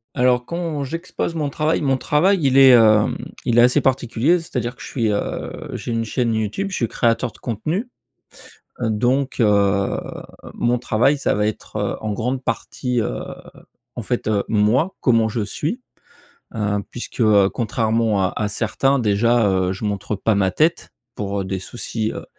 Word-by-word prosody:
Alors 125 Hz, -1 st, +2 dB
quand 165 Hz, -3 st, -3 dB
j'expose 165 Hz, +3 st, -4 dB
mon 150 Hz, -3 st, -1 dB
travail 155 Hz, +3 st, 0 dB
mon 135 Hz, -2 st, +1 dB
travail 180 Hz, +9 st, +2 dB
il 135 Hz, -2 st, +3 dB
est, 135 Hz, -1 st, +8 dB
hem, 110 Hz, -3 st, +5 dB, 0.3 s
il 120 Hz, 0 st, +3 dB
est -, -, +8 dB
assez 125 Hz, +1 st, +4 dB
particulier, 130 Hz, +5 st, +1 dB
c'est-à-dire 125 Hz, -7 st, -4 dB
que -, -, -16 dB
je -, -, -7 dB
suis, 115 Hz, -5 st, -1 dB
heu, 100 Hz, -, -3 dB, 0.2 s
j'ai 120 Hz, -, -5 dB
une 115 Hz, 0 st, -1 dB
chaîne 115 Hz, 0 st, -1 dB
YouTube, 110 Hz, -, -2 dB
je -, -, -3 dB
suis 115 Hz, -, 0 dB
créateur 115 Hz, +2 st, 0 dB
de -, -, -19 dB
contenu. 155 Hz, -, -3 dB, 0.9 s
Donc 125 Hz, +5 st, 0 dB
heu, 100 Hz, -2 st, +2 dB, 0.6 s
mon 120 Hz, +1 st, +1 dB
travail, 120 Hz, +5 st, +2 dB
ça -, -, 0 dB
va 105 Hz, +1 st, +1 dB
être, 110 Hz, -, -5 dB
heu, -, -, -1 dB
en 110 Hz, -1 st, -3 dB
grande 125 Hz, +5 st, -2 dB
partie, 125 Hz, -1 st, -2 dB
heu, -, -, -2 dB, 0.8 s
en -, -, -4 dB
fait, -, -, -2 dB
heu, 105 Hz, -2 st, +1 dB
moi, 115 Hz, -, +2 dB
comment 115 Hz, -3 st, +3 dB
je 110 Hz, +1 st, -3 dB
suis, 155 Hz, -, -3 dB, 0.7 s
heu, 105 Hz, -2 st, 0 dB
puisque, 120 Hz, -, -7 dB
heu, 105 Hz, -3 st, +5 dB
contrairement 110 Hz, -3 st, 0 dB
à 95 Hz, -, -1 dB
à 105 Hz, -, -1 dB
certains 135 Hz, +6 st, 0 dB
déjà 105 Hz, -4 st, +2 dB
je 95 Hz, +3 st, -7 dB
montre 105 Hz, 0 st, -2 dB
pas 105 Hz, +2 st, +1 dB
ma 95 Hz, -1 st, +2 dB
tête 160 Hz, -, 0 dB, 0.2 s
pour 100 Hz, -1 st, -3 dB
des 95 Hz, 0 st, -3 dB
soucis, 110 Hz, +2 st, -4 dB
heu -, -, -7 dB
115 Hz, 170 wpm, -21 LUFS, 105-135 Hz, 0.9 s, est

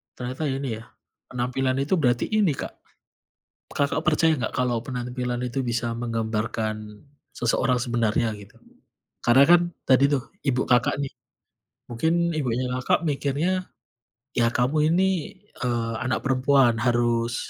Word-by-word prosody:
Ternyata 130 Hz, +5 st, -4 dB
ini 135 Hz, -5 st, -3 dB
ya, -, -, -12 dB, 0.4 s
penampilan 125 Hz, +1 st, -1 dB
itu 155 Hz, +7 st, +1 dB
berarti 120 Hz, -5 st, +1 dB
ini, 210 Hz, -7 st, +2 dB
Kak, -, -, -6 dB, 1.0 s
Kakak 145 Hz, +2 st, 0 dB
percaya 160 Hz, -1 st, +3 dB
nggak 120 Hz, -, -3 dB
kalau 125 Hz, -2 st, 0 dB
penampilan 125 Hz, -1 st, -3 dB
itu 125 Hz, +1 st, -2 dB
bisa 120 Hz, -1 st, -1 dB
menggambarkan 110 Hz, -2 st, -3 dB, 0.3 s
seseorang 125 Hz, +1 st, +1 dB
sebenarnya, 115 Hz, -1 st, 0 dB
gitu? 100 Hz, 0 st, -15 dB, 0.7 s
Karena 120 Hz, +4 st, +6 dB
kan 175 Hz, 0 st, +8 dB, 0.3 s
tadi 130 Hz, +1 st, +5 dB
tuh 135 Hz, -3 st, +1 dB, 0.2 s
ibu 130 Hz, -1 st, +2 dB
Kakak 125 Hz, -1 st, +3 dB
nih, 135 Hz, -, -4 dB, 0.8 s
mungkin 170 Hz, +8 st, +1 dB
ibunya 125 Hz, -3 st, -1 dB
Kakak 130 Hz, -, +1 dB
mikirnya, 150 Hz, +6 st, -1 dB, 0.7 s
"Ya, 115 Hz, -1 st, +4 dB
kamu 150 Hz, +5 st, +2 dB
ini, 190 Hz, +1 st, +3 dB, 0.5 s
eee, 115 Hz, -2 st, -1 dB
anak 130 Hz, +1 st, 0 dB
perempuan 135 Hz, -2 st, +3 dB
harus" 120 Hz, -1 st, +1 dB
125 Hz, 125 wpm, -24 LUFS, 120-140 Hz, 1.0 s, kan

